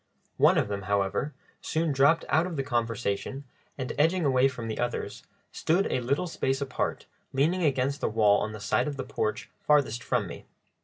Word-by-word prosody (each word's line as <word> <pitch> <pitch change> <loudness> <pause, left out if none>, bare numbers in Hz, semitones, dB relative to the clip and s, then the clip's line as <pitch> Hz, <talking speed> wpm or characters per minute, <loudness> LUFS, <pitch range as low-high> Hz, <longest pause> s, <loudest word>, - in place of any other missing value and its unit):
One - - +5
of - - +2
them, 100 -1 -3
however, 100 +8 0 0.3
soon 160 0 0
dropped 140 +4 +4
out 160 +4 +2
of 175 - -5
the 135 - -1
conversation, 120 0 -2 0.3
and, 130 -2 -3
edging 165 +3 +3
away 130 -1 +4
from 125 -4 -5
the 110 - -4
others, 120 0 -3 0.3
stood 180 +5 +1
a - - +1
little 135 +8 0
space 135 -5 -1
apart, 140 -2 -2 0.3
leaning 160 +7 +2
against 140 -1 +1
the - - +1
wall 105 -2 +4
on 110 - -2
the 110 - -8
side 100 - +1
of 145 -2 -4
the 135 - -3
porch 110 -5 -3
farthest 140 -6 +2
from 125 -5 0
me. 85 - -9
135 Hz, 190 wpm, -28 LUFS, 115-150 Hz, 0.3 s, One